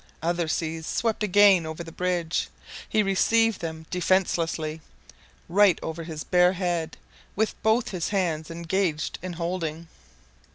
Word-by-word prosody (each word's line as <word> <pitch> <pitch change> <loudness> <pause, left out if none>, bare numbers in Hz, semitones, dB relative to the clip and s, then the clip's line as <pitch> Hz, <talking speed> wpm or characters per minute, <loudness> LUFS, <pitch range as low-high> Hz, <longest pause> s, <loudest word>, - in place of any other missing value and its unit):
Other 170 0 0
seas 160 0 -2
swept 225 -2 -1
again 200 -3 +5
over 160 +2 -5
the 165 - -10
bridge. 175 -1 -1 0.4
He 215 -1 +2
received 225 +3 +2
them 160 -1 -5
defencelessly 170 -4 0 0.7
right 195 0 +5
over 160 +1 -4
his 155 -2 -6
bare 180 0 +4
head, 175 -3 -2 0.4
with 220 +2 +1
both 225 +3 +2
his 180 -4 -3
hands 170 -6 -1
engaged 170 -1 -1
in 185 -1 -5
holding. 170 -1 -4
175 Hz, 130 wpm, -26 LUFS, 160-195 Hz, 0.7 s, again